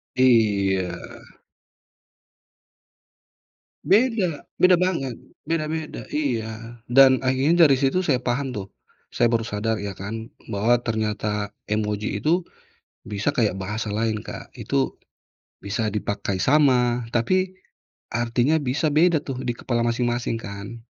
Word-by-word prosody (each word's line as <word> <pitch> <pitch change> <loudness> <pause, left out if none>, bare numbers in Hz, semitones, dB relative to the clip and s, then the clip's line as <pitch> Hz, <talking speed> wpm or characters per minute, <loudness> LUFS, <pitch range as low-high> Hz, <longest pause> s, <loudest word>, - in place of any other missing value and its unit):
Iya. 100 -7 +3 2.9
Beda, 195 - +2 0.2
beda 185 -1 +7
banget. 170 -9 -1 0.2
Beda-beda, 160 -1 -3
iya. 115 -5 -3
Dan 130 +1 +6
akhirnya 140 +7 +4
dari 140 - +5
situ 160 +7 +1
saya 130 -6 +1
paham 130 +1 -1
tuh, 100 -3 -5 0.4
saya 120 - +1
baru 115 -1 +2
sadar 110 0 -2
ya 100 -1 -4
kan, 110 +3 -6 0.2
bahwa 115 +5 +3
ternyata 105 -2 -1 0.2
emoji 105 -1 -2
itu 170 +3 +1 0.6
bisa 105 +7 -1
kayak 110 -8 +1
bahasa 105 +3 -4
lain, 110 0 0
Kak. - - -9
Itu - - -1 0.6
bisa 110 +2 -2
dipakai 100 -1 -2
sama, 125 -3 +3
tapi 185 +11 0 0.5
artinya 120 +5 +1
bisa 145 +3 0
beda 165 +2 +4
tuh, 130 -2 -5
di 125 -2 -1
kepala 120 -1 -1
masing-masing 120 0 0
kan. 110 +2 -8
120 Hz, 115 wpm, -23 LUFS, 110-145 Hz, 2.9 s, beda